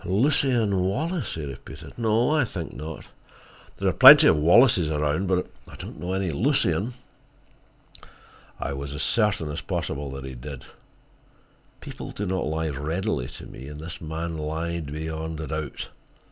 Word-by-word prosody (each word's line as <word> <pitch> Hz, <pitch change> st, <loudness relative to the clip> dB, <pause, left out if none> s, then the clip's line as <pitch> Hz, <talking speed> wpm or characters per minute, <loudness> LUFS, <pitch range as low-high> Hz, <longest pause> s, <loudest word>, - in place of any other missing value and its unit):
"Lucien 115 Hz, -, +2 dB
Wallace?" 135 Hz, -, -1 dB
he 80 Hz, -2 st, -5 dB
repeated. 70 Hz, -2 st, -10 dB
"No, 115 Hz, +3 st, +2 dB
I 155 Hz, -2 st, +3 dB
think 90 Hz, -8 st, -5 dB
not. 75 Hz, +4 st, -7 dB, 0.7 s
There -, -, -1 dB
are -, -, +2 dB
plenty -, -, +10 dB
of -, -, +6 dB
Wallaces 85 Hz, -, +5 dB
around, 75 Hz, +4 st, 0 dB
but 90 Hz, 0 st, +1 dB, 0.2 s
I -, -, -12 dB
don't -, -, -9 dB
know 90 Hz, +1 st, -3 dB
any 95 Hz, -2 st, -1 dB
Lucien." 110 Hz, -, +1 dB, 1.6 s
I 70 Hz, -, -3 dB
was 70 Hz, +1 st, -5 dB
as 75 Hz, -, -1 dB
certain 105 Hz, -9 st, +1 dB
as 75 Hz, 0 st, -4 dB
possible 70 Hz, 0 st, -3 dB
that 70 Hz, 0 st, -7 dB
he 65 Hz, -, -7 dB
did. 65 Hz, +1 st, -8 dB, 1.2 s
People -, -, -8 dB
do 105 Hz, -, -4 dB
not 95 Hz, -4 st, -1 dB
lie 80 Hz, +1 st, -1 dB
readily 75 Hz, -, -2 dB
to 65 Hz, -, -10 dB
me, 65 Hz, -, -10 dB
and 75 Hz, 0 st, -8 dB
this 80 Hz, +2 st, -7 dB
man 80 Hz, 0 st, -4 dB
lied 80 Hz, 0 st, -3 dB
beyond 80 Hz, +1 st, -4 dB
a 80 Hz, -, -4 dB
doubt. 80 Hz, -2 st, -5 dB
80 Hz, 160 wpm, -25 LUFS, 75-100 Hz, 1.6 s, plenty